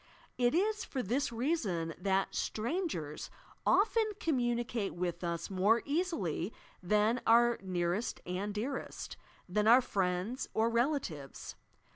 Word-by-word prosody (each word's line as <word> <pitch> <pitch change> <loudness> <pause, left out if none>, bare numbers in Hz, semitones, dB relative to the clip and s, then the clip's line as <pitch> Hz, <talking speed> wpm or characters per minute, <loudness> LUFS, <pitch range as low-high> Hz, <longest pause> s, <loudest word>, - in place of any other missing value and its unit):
It 245 +3 +2
is 425 +3 +1
for 260 -2 -3
thia 230 - -1
that 195 +1 +1
"strangers" 220 - -2 0.4
often 435 +1 +3
commimicate 240 -6 0
with 175 0 -3
us 170 +1 -3
more 205 +5 +3
easily 280 - -1 0.3
than 210 +6 +2
oar 235 +1 +5
nearest 180 +3 -1
and 185 +3 -2
dearest, 235 +7 -4 0.2
— - - -29
than 210 +4 +1
our 240 +3 +8
friends 195 +1 -1
or 225 +1 +3
rela 260 +6 +2
tives. 145 - -8
225 Hz, 120 wpm, -33 LUFS, 180-255 Hz, 0.4 s, our